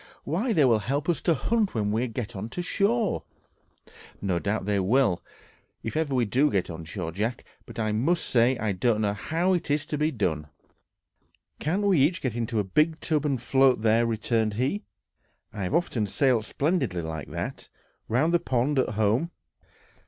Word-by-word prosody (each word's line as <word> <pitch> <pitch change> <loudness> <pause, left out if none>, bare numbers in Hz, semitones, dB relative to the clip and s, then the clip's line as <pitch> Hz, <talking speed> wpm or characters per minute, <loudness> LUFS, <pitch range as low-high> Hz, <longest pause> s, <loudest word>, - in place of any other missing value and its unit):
Why, 190 - -1
they 155 -9 +4
will 115 -4 +4
help 140 +7 -2
us 170 - +1
to 170 - +2
hunt 215 - 0
when 105 -2 0
we 115 +4 0
get 115 -1 -5
on 100 +4 -5
shore!" 200 - 0 1.0
"No 95 -3 0
doubt 105 +2 -2
they 100 -1 +1
will, 100 -1 +2 0.6
if 115 - -4
ever 155 -4 0
we 125 -2 +2
do 130 +8 +2
get 95 -3 -1
on 80 0 -7
shore, 80 +1 -5
Jack; 110 +7 -2 0.2
but - - -11
I 110 -2 0
must 145 +11 +1
say 120 +1 +3
I 110 -1 -1
don't 105 +3 +1
know 100 -1 +1
how 165 - 0
it 175 -3 -1
is 145 +1 +1
to 150 -1 -3
be 155 +1 +2
done." 80 - -2 1.1
"Can't 180 +7 0
we 195 -6 +3
each 160 +6 +3
get 125 -4 -3
into 115 -1 -2
a 105 - +2
big 155 - +1
tub, 155 -2 0
and 135 -3 0
float 130 0 +3
there?" 115 +1 +3
returned 110 -1 0
he. 135 - 0 0.7
"I 105 - -5
have 95 +10 -1
often 125 -11 0
sailed 120 0 +2
splendidly 140 - -1
like 80 -2 -5
that, - - -5 0.4
round 140 +9 +2
the 175 - +4
pond 130 +2 0
at 115 -4 0
home." 110 +9 +1
125 Hz, 185 wpm, -26 LUFS, 105-155 Hz, 1.1 s, they